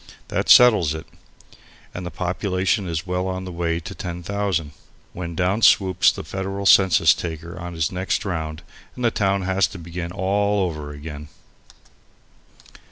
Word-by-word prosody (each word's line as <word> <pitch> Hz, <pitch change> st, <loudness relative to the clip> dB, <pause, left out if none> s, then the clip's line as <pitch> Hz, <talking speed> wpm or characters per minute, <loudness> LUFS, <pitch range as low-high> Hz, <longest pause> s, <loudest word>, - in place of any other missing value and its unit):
That -, -, -2 dB
settles 105 Hz, -11 st, +6 dB
it, 80 Hz, +1 st, -7 dB, 0.9 s
and 90 Hz, -, -6 dB
the 85 Hz, -, -4 dB
population 95 Hz, +3 st, -1 dB
is 80 Hz, 0 st, -3 dB
well 90 Hz, 0 st, -2 dB
on 95 Hz, 0 st, -4 dB
the 90 Hz, -, -6 dB
way 85 Hz, -1 st, -1 dB
to 85 Hz, -, -8 dB
10,000, 90 Hz, -2 st, -3 dB, 0.4 s
when 85 Hz, -2 st, -6 dB
down 95 Hz, +5 st, 0 dB
swoops 95 Hz, -5 st, +5 dB
the -, -, -7 dB
federal 95 Hz, +1 st, -4 dB
census 95 Hz, -2 st, +6 dB
taker 85 Hz, 0 st, -6 dB
on 85 Hz, -1 st, -7 dB
his 80 Hz, -1 st, -1 dB
next 95 Hz, +2 st, -2 dB
round 80 Hz, -4 st, -4 dB, 0.3 s
and 125 Hz, -, -3 dB
the 115 Hz, -, +3 dB
town 100 Hz, -2 st, 0 dB
has 95 Hz, -2 st, +2 dB
to 95 Hz, -, -10 dB
begin 85 Hz, 0 st, -6 dB
all 100 Hz, +1 st, +1 dB
over 75 Hz, -3 st, -6 dB
again. 75 Hz, 0 st, -8 dB
90 Hz, 155 wpm, -22 LUFS, 85-95 Hz, 0.9 s, settles